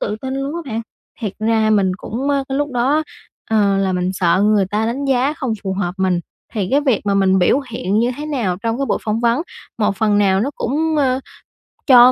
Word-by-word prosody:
tự 210 - -2
tin 265 0 -3
luôn 275 +2 -3
á 340 - -3
bạn. 225 +1 -2 0.4
Thiệt 210 -4 -3
ra 220 0 +2
mình 195 -3 +3
cũng, 255 +8 -4
ờ, 280 -1 +1
cái 270 0 -1
lúc 290 0 -1
đó 250 +3 +2
á, 310 - +2 0.5
ờ, 205 -3 +3
là 190 -1 +1
mình 180 0 0
sợ 185 0 +2
người 210 -2 +3
ta 215 +2 0
đánh 255 +5 -2
giá 270 +1 +2
không 255 -7 -2
phù 190 - -2
hợp 180 -2 -2
mình. 185 -2 +1 0.3
Thì 200 -4 -1
cái 280 +2 +4
việc 260 -8 +1
mà 200 - +2
mình 190 -1 +3
biểu 215 +10 +3
hiện 205 -3 -1
như 240 +2 +2
thế 300 - -5
nào 235 -12 -1
trong 230 +1 -1
cái 275 - -1
buổi - - 0
phỏng 220 0 -1
vấn, 235 +5 +2 0.4
một 210 -2 +1
phần 210 0 +2
nào 195 -2 +3
nó 260 +7 0
cũng, 310 +5 -1
ờ, 265 -3 +2 0.7
cho 250 -2 +8
225 Hz, 240 wpm, -19 LUFS, 195-270 Hz, 0.7 s, cho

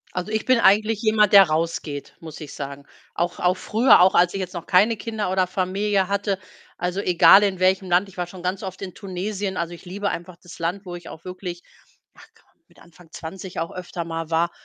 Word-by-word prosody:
Also, 180 +4 -3
ich 220 0 -1
bin 255 -2 +4
eigentlich 215 +2 +3
jemand, 215 -2 +3
der 195 -1 +10
rausgeht, 155 -2 -3
muss 160 -2 -9
ich 150 -3 -9
sagen. 140 0 -7 0.3
Auch 175 +1 -2
auch 180 +1 +2
früher, 230 +5 +4
auch 185 +1 +5
als 175 +1 +4
ich 195 - -3
jetzt 185 -1 -5
noch 170 -1 -6
keine 210 +5 +4
Kinder 215 -2 -4
oder 185 0 +2
Familie 190 +1 0
hatte, 200 -1 -1 0.4
also, 180 +3 -2
egal 180 +2 +6
in 190 -2 0
welchem 185 0 +2
Land. 180 +3 +3
Ich 195 - -16
war 180 -1 -2
schon 175 0 -12
ganz 185 +2 -3
oft 190 0 -7
in 185 -2 -6
Tunesien. 195 0 -4
Also, 170 +1 -3
ich 170 - -12
liebe 200 +3 -3
einfach 175 0 -6
das 175 - -12
Land, 180 +4 -3
wo 175 -1 -6
ich 175 -1 -10
auch 165 - -12
wirklich 180 -1 -7 0.5
ach - - -17
komm, - - -31
mit - - -23
Anfang 170 0 -19
20 180 +3 -7
auch 165 - -3
öfter 175 -2 -6
mal 165 -1 -5
war. 170 +1 +1
185 Hz, 220 wpm, -23 LUFS, 175-200 Hz, 0.5 s, der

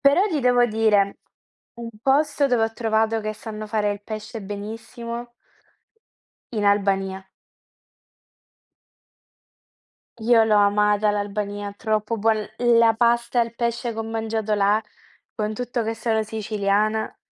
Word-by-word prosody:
Però 285 +9 +4
ti 310 -6 -1
devo 245 -1 +4
dire 215 -3 +2 0.6
un 235 0 -7
posto 285 +2 +2
dove 245 -4 +2
ho 225 - -3
trovato 225 0 0
che 215 0 -3
sanno 215 0 -7
fare 210 -1 0
il 205 - -9
pesce 215 +1 -7
benissimo 225 +4 -7 1.2
in 215 -3 -2
Albania. 195 -1 +1 3.0
Io 225 0 +5
l'ho 215 -1 +3
amata 210 +1 +3
l'Albania, 205 0 -3
troppo 215 +1 -1
buon 220 +1 +2 0.2
l 240 -1 +4
la 230 -1 +6
pasta 235 +1 +2
e - - +4
il 230 - -13
pesce 235 0 -2
che 220 - -9
ho - - -1
mangiato 220 -1 -3
là, 205 0 +3 0.6
con 215 0 -2
tutto 245 +1 -2
che 225 +1 -2
sono 220 0 0
siciliana. 215 0 -1
220 Hz, 130 wpm, -23 LUFS, 210-235 Hz, 3.0 s, la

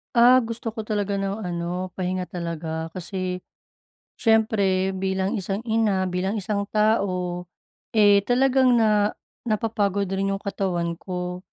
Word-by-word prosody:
Ah, 245 +2 +7
gusto 230 -1 -4
ko 220 - -9
talaga 205 -2 -1
ng 195 +2 -3
ano 180 +1 -3
pahinga 185 0 -2
talaga. 165 -2 -4
Kasi, 185 0 -4 0.8
siyempre 205 -4 +2
bilang 190 0 -1
isang 195 +3 -3
ina, 220 -4 +1
bilang 185 +3 -1
isang 200 0 -2
tao, 185 -5 0 0.5
eh, 205 -2 +6
talagang 255 0 +4
na 210 -2 +3 0.3
napapagod 210 -2 0
rin 195 0 0
yung 195 - -9
katawan 175 -4 -2
ko. 180 -1 -4
195 Hz, 125 wpm, -24 LUFS, 180-215 Hz, 0.8 s, Ah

